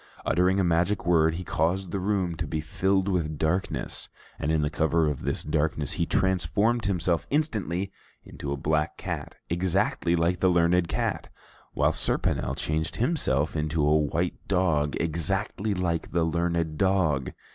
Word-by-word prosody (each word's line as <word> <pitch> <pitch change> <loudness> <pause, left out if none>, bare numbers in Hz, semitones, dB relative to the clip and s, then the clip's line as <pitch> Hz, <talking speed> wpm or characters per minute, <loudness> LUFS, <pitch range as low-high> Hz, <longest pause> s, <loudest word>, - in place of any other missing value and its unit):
Uttering 90 +2 +2
a - - +3
magic 85 +3 +1
word, 80 -2 +3
he 90 - -5
caused 90 +2 -1
the 100 - -2
room 95 -2 0
to 80 - -3
be 80 +1 -2
filled 95 +5 0
with 80 -5 -1
darkness, 85 +5 -2 0.3
and 75 - 0
in 80 -1 +2
the 75 - +1
cover 80 +1 +2
of 75 -3 -2
this - - -2
darkness 75 -1 -1
he 85 - -1
transformed 100 +5 +1
himself 85 -3 0
instantly 105 - -1 0.3
into 70 - -7
a 70 - -1
black 75 +2 0
cat - - -5
exactly 85 0 +1
like 85 +1 +1
the 95 - +3
learned 85 0 +3
cat, - - -2 0.4
while - - +2
Serponel 65 -3 0
changed 80 +1 -2
himself 110 - +1
into 75 0 0
a 75 +1 +4
white 75 -2 -1
dog 80 -7 +1
exactly 95 +5 -1
like 85 -3 -1
the 85 -1 +2
learned 85 -1 -1
dog. 90 -9 +1
85 Hz, 155 wpm, -27 LUFS, 80-95 Hz, 0.4 s, a